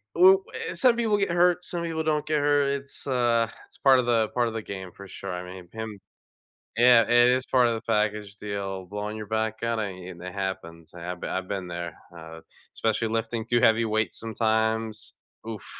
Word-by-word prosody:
u 190 Hz, +2 st, +7 dB, 0.3 s
eh -, -, -4 dB
some 235 Hz, +7 st, +4 dB
people 225 Hz, -3 st, +1 dB
get 195 Hz, -3 st, 0 dB
hurt, 175 Hz, 0 st, +3 dB
some 170 Hz, -1 st, -4 dB
people 160 Hz, -1 st, -2 dB
don't 150 Hz, -1 st, 0 dB
get 155 Hz, -1 st, +2 dB
hurt, 145 Hz, -1 st, +3 dB
it's, 140 Hz, 0 st, -5 dB
uh, 120 Hz, -3 st, +2 dB, 0.2 s
it's -, -, -14 dB
part 135 Hz, -2 st, +5 dB
of 125 Hz, -, 0 dB
the 115 Hz, -2 st, +2 dB
part 120 Hz, -1 st, +1 dB
of 115 Hz, -, -4 dB
the 110 Hz, -, -3 dB
game, 95 Hz, -3 st, -7 dB
for 100 Hz, 0 st, -11 dB
sure. 95 Hz, 0 st, -7 dB
I 90 Hz, 0 st, -4 dB
mean, 90 Hz, -1 st, -10 dB
him 110 Hz, -2 st, -6 dB, 0.8 s
Yeah. 120 Hz, -1 st, +7 dB
It 120 Hz, +1 st, +5 dB
is 130 Hz, 0 st, +2 dB
part 125 Hz, -2 st, +4 dB
of 115 Hz, -, +1 dB
the 110 Hz, -, -5 dB
package 105 Hz, -1 st, 0 dB
deal, 100 Hz, -2 st, -4 dB
blowing 105 Hz, +2 st, -5 dB
your 105 Hz, -, -6 dB
back 110 Hz, 0 st, -2 dB
at 115 Hz, -1 st, 0 dB
it, 95 Hz, -3 st, -5 dB
and 85 Hz, 0 st, -12 dB
it 90 Hz, 0 st, -7 dB
happens. 85 Hz, -4 st, -5 dB
I 85 Hz, -, -9 dB
have 90 Hz, 0 st, -5 dB
b -, -, -3 dB
I've 95 Hz, 0 st, -3 dB
been 95 Hz, -3 st, -4 dB
there, 85 Hz, -2 st, -5 dB, 0.2 s
uh, 80 Hz, 0 st, -10 dB, 0.3 s
especially 110 Hz, 0 st, 0 dB
lifting 115 Hz, 0 st, -2 dB
too 120 Hz, -1 st, +2 dB
heavy 115 Hz, -1 st, +4 dB
weights 110 Hz, 0 st, -1 dB
sometimes, 110 Hz, 0 st, -1 dB, 0.3 s
oof, 110 Hz, -3 st, -6 dB
110 Hz, 215 wpm, -26 LUFS, 100-125 Hz, 0.8 s, u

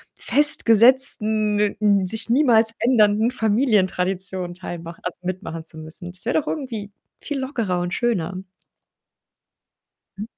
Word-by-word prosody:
festgesetzten, 225 Hz, -5 st, +4 dB, 0.2 s
n 200 Hz, -3 st, +1 dB
sich 220 Hz, +2 st, -5 dB
niemals 230 Hz, -4 st, +3 dB
ändernden 225 Hz, -1 st, +1 dB
Familientradition 190 Hz, -6 st, -1 dB
teilmach 170 Hz, -2 st, -9 dB
also, 180 Hz, -, -7 dB
mitmachen 165 Hz, -3 st, -6 dB
zu 160 Hz, -, -5 dB
müssen. 160 Hz, +3 st, -7 dB
Das 185 Hz, +3 st, -2 dB
wäre 245 Hz, -, 0 dB
doch 300 Hz, -, -19 dB
irgendwie 230 Hz, -9 st, -6 dB, 0.3 s
viel 290 Hz, -2 st, -5 dB
lockerer 230 Hz, -9 st, -3 dB
und 175 Hz, 0 st, -5 dB
schöner. 190 Hz, -6 st, -3 dB, 1.8 s
Hm. 210 Hz, -, -5 dB
210 Hz, 115 wpm, -20 LUFS, 180-235 Hz, 1.8 s, festgesetzten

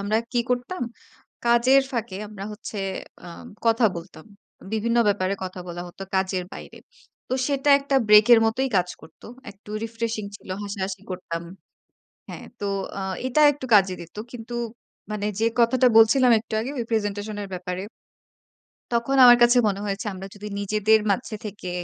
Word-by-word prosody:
আমরা 205 Hz, +2 st, 0 dB, 0.2 s
কি 240 Hz, -, +2 dB
করতাম? 250 Hz, +7 st, -2 dB, 0.6 s
কাজের 240 Hz, +3 st, +5 dB
ফাঁকে 230 Hz, -5 st, -3 dB
আমরা 200 Hz, -2 st, -8 dB
হচ্ছে, 210 Hz, 0 st, -7 dB, 0.5 s
আ -, -, -8 dB, 0.4 s
কথা 230 Hz, 0 st, +4 dB
বলতাম। 170 Hz, -1 st, -10 dB, 0.5 s
বিভিন্ন 230 Hz, +2 st, +1 dB
ব্যাপারে 195 Hz, -1 st, +1 dB
কথা 185 Hz, 0 st, -7 dB
বলা 175 Hz, 0 st, -6 dB
হতো 185 Hz, -, -11 dB
কাজের 190 Hz, -1 st, 0 dB
বাইরে। -, -, -10 dB, 0.5 s
তো -, -, 0 dB
সেটা 280 Hz, 0 st, +1 dB
একটা 275 Hz, -1 st, 0 dB
ব্রেকের 210 Hz, +3 st, +8 dB
মতোই 260 Hz, +4 st, 0 dB
কাজ 180 Hz, -1 st, +2 dB
করতো। 160 Hz, -, -15 dB, 0.2 s
একটু 200 Hz, +1 st, -16 dB
রিফ্রেশিং 230 Hz, -1 st, -3 dB
ছিল। -, -, -19 dB, 0.2 s
হাসাহাসি 195 Hz, -1 st, -4 dB
করতাম। 170 Hz, -2 st, -5 dB, 0.9 s
হ্যাঁ, -, -, -9 dB
তো -, -, -4 dB, 0.3 s
অ্যা 195 Hz, -, -4 dB, 0.2 s
এটা 260 Hz, +4 st, +1 dB
একটু 275 Hz, -2 st, -8 dB
কাজে 190 Hz, -2 st, +5 dB
দিত। 170 Hz, +3 st, -12 dB, 0.2 s
কিন্তু, 240 Hz, 0 st, -8 dB, 0.6 s
মানে 210 Hz, -1 st, -2 dB
যে 225 Hz, -, +3 dB
কথাটা 255 Hz, +2 st, +4 dB
বলছিলাম 235 Hz, +3 st, +6 dB
একটু 220 Hz, -, -16 dB
আগে, 240 Hz, +4 st, -4 dB
ওই 235 Hz, -, -1 dB
প্রেজেন্টেশন 205 Hz, -1 st, -2 dB
এর 200 Hz, -, -7 dB
ব্যাপারে। 180 Hz, 0 st, -5 dB, 1.1 s
তখন 235 Hz, +3 st, +1 dB
আমার 245 Hz, -1 st, +9 dB
কাছে 240 Hz, +1 st, +6 dB
মনে 200 Hz, -1 st, -2 dB
হয়েছে 200 Hz, +1 st, -3 dB
আমরা 190 Hz, +1 st, -8 dB
যদি 210 Hz, +1 st, -8 dB
নিজেদের 215 Hz, +2 st, +3 dB
মাঝে 220 Hz, +1 st, -1 dB
থেকে, 200 Hz, -3 st, -7 dB
215 Hz, 155 wpm, -24 LUFS, 195-240 Hz, 1.1 s, আমার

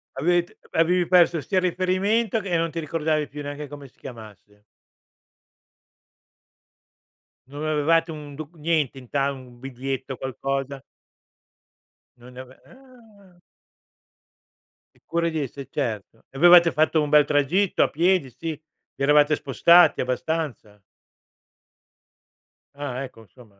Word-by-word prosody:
Avete 175 Hz, +5 st, 0 dB
avevi 175 Hz, +2 st, +2 dB
perso 175 Hz, -2 st, +4 dB
sia 185 Hz, +5 st, 0 dB
il -, -, -4 dB
riferimento 200 Hz, +5 st, 0 dB
che 200 Hz, -, -7 dB
e 175 Hz, -, +1 dB
non 165 Hz, 0 st, 0 dB
ti 165 Hz, +1 st, -5 dB
ricordavi 155 Hz, -1 st, -1 dB
più 145 Hz, +1 st, -8 dB
neanche 145 Hz, 0 st, -7 dB
come 145 Hz, -1 st, -10 dB
si -, -, -27 dB
chiamasse. 105 Hz, -4 st, -13 dB, 2.8 s
Non 145 Hz, +3 st, -7 dB
avevate 160 Hz, +2 st, +1 dB
un 150 Hz, -2 st, -9 dB
docu 155 Hz, +3 st, -10 dB
niente 155 Hz, -4 st, -1 dB
in 125 Hz, -2 st, -16 dB
ta 140 Hz, 0 st, 0 dB
un 125 Hz, -3 st, -12 dB
biglietto, 135 Hz, 0 st, -5 dB
qualcosa? 135 Hz, +2 st, -4 dB, 1.4 s
Non 125 Hz, +1 st, -15 dB
ne 125 Hz, -, -11 dB
ave 130 Hz, 0 st, -15 dB
ah. 225 Hz, -9 st, -20 dB, 1.5 s
Il -, -, -30 dB
cuore 170 Hz, 0 st, -1 dB
di 160 Hz, -1 st, -3 dB
esse, 140 Hz, 0 st, -7 dB
certo. 115 Hz, -5 st, -5 dB
E 135 Hz, -, -12 dB
avevate 175 Hz, +1 st, +7 dB
fatto 155 Hz, +1 st, +2 dB
un 150 Hz, -, -2 dB
bel 150 Hz, -1 st, +5 dB
tragitto 150 Hz, +7 st, +1 dB
a -, -, +1 dB
piedi, 170 Hz, -2 st, +1 dB
sì, 165 Hz, +6 st, -7 dB
vi 155 Hz, -2 st, -10 dB
eravate 150 Hz, +1 st, +4 dB
spostati 170 Hz, +5 st, +4 dB
abbastanza? 125 Hz, -5 st, -4 dB, 1.9 s
Ah 140 Hz, -2 st, -5 dB
ecco 115 Hz, -4 st, -12 dB
insomma. 100 Hz, 0 st, -20 dB
150 Hz, 130 wpm, -23 LUFS, 135-170 Hz, 2.8 s, avevate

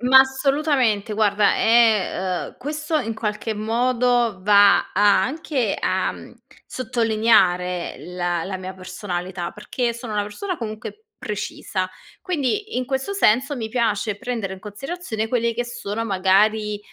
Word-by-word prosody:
Ma 255 Hz, +2 st, +7 dB
assolutamente. 265 Hz, -5 st, +2 dB
Guarda, 205 Hz, -1 st, +3 dB
è 215 Hz, -5 st, +2 dB
uhm, -, -, -16 dB
questo 305 Hz, +2 st, -2 dB
in 225 Hz, -4 st, -3 dB
qualche 215 Hz, 0 st, -3 dB
modo 240 Hz, 0 st, +1 dB
va 205 Hz, 0 st, +5 dB
a 200 Hz, -1 st, +4 dB
anche 265 Hz, -3 st, -1 dB
a, -, -, 0 dB
uhm, -, -, -11 dB, 0.3 s
sottolineare 215 Hz, -7 st, +1 dB
la 175 Hz, -1 st, -3 dB
la 190 Hz, -1 st, -4 dB
mia 185 Hz, 0 st, -7 dB
personalità. 180 Hz, -2 st, -5 dB
Perché 235 Hz, +3 st, -2 dB
sono 235 Hz, -2 st, -7 dB
una 205 Hz, 0 st, 0 dB
persona, 350 Hz, -, -5 dB
comunque, 225 Hz, -, -7 dB
precisa, 210 Hz, -5 st, -4 dB, 0.3 s
quindi, 365 Hz, -, -2 dB
in 255 Hz, -, 0 dB
questo 265 Hz, +7 st, -2 dB
senso, 275 Hz, -, +3 dB
mi 220 Hz, -2 st, -4 dB
piace 215 Hz, -3 st, 0 dB
prendere 235 Hz, -6 st, -3 dB
in -, -, -12 dB
considerazione 220 Hz, -, -5 dB
quelli 235 Hz, -1 st, 0 dB
che 245 Hz, -, -1 dB
sono 230 Hz, -2 st, -4 dB
magari, 210 Hz, +2 st, +2 dB
220 Hz, 135 wpm, -22 LUFS, 200-255 Hz, 0.3 s, Ma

